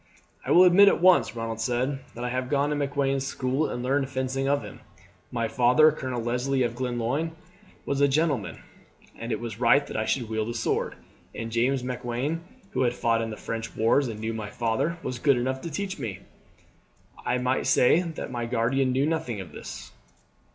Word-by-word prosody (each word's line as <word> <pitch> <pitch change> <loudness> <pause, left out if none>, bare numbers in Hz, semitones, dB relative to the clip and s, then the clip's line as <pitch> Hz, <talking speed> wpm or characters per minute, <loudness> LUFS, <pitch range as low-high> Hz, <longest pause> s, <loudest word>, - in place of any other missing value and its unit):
"I - - -7
will 180 - +7
admit 185 +3 +7
at - - +4
once," 175 -11 +4
Ronald 115 -1 -4
said, 125 +4 0 0.2
"that 120 - -6
I 125 - -1
have 125 0 -2
gone 145 0 +1
to - - 0
Macklewain's 140 -1 0
school 135 +2 -1
and 120 - -4
learned 135 +1 0
fencing 130 0 -2
of 140 +1 +1
him. - - -10 0.5
My 115 -1 -1
father, 125 +7 +5
Colonel 130 -5 -4
Leslie 125 +3 0
of 120 -1 -1
Glenlyon, 125 +6 -2 0.5
was 140 0 -1
a 140 - +6
gentleman, 140 -6 0 0.6
and 115 +1 -5
it 110 - -1
was 115 -2 -6
right 125 +4 +4
that - - -8
I 110 - 0
should 125 -4 0
wield 110 0 -2
a 120 - -4
sword, 115 - -1 0.4
and 115 0 -5
James 125 +3 +1
Macklewain, 125 +5 -3 0.3
who - - -1
had 120 -1 +1
fought 115 -2 +1
in 115 - -3
the 110 - -6
French 115 0 -5
wars 115 +5 +3
and 110 -2 -6
knew 110 +1 -3
my 110 -2 -5
father, 115 +10 -1
was 125 - -4
good 140 -1 +3
enough 130 +2 -1
to 170 - -5
teach 190 +5 -4
me. 100 -3 -5 1.0
I 125 - 0
may 125 +1 0
say 140 +7 +4
that 165 -5 -6
my 120 -1 -3
guardian 125 +3 +1
knew 135 +2 +2
nothing 155 -9 -2
of 95 -3 -8
this." - - -9
125 Hz, 200 wpm, -26 LUFS, 115-140 Hz, 1.0 s, will